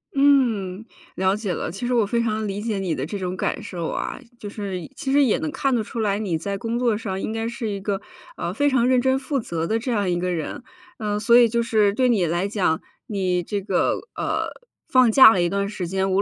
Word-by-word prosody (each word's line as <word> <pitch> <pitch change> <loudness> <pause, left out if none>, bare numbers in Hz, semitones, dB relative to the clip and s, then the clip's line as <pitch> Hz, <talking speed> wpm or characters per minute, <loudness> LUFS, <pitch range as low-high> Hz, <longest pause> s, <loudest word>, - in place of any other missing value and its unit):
嗯， 230 -8 +2 0.3
了 190 +1 +2
解 210 -4 -3
了。 - - -3
其 195 +7 -5
实 250 - 0
我 230 -4 +3
非 235 +3 0
常 220 -1 -1
理 200 +1 -3
解 215 -3 -2
你 180 -4 -1
的 135 - -3
这 200 +5 -5
种 185 0 -3
感 - - -2
受 170 -3 -4
啊。 - - -4 0.2
就 205 - -6
是 190 -6 -5
其 270 - -3
实 285 0 +5
也 250 -1 +3
能 305 +2 -3
看 270 -1 0
得 225 - 0
出 230 - -6
来 205 -2 +1
你 185 -7 -1
在 200 +4 -3
工 235 +2 -2
作 235 -4 +2
上 195 -3 -4
应 - - -3
该 225 0 -2
是 235 -1 -4
一 200 -1 -3
个， 195 0 -2 0.4
呃， - - -3
非 290 0 +2
常 250 -3 +2
认 255 -1 +4
真 265 +1 +2
负 275 +1 -2
责 165 -7 -3
的 225 - +1
这 245 +3 -3
样 205 -5 0
一 175 -1 0
个 180 0 -1
人。 165 +7 -4 0.3
呃， 210 -2 -2
所 235 +2 +5
以 240 - +7
就 235 +1 0
是 215 -3 +2
对 255 +2 +2
你 205 -7 +3
来 175 +4 0
讲， 190 -6 0 0.3
你 185 -4 0
这 200 +2 -3
个， 190 -2 +1 0.2
呃， - - -1 0.4
放 255 -3 +5
假 240 -2 +9
了 185 - +1
一 175 - +1
段 200 0 -1
时 185 -4 -4
间， 190 +1 0
无 195 - +3
210 Hz, 265 characters per minute, -23 LUFS, 190-235 Hz, 0.4 s, 假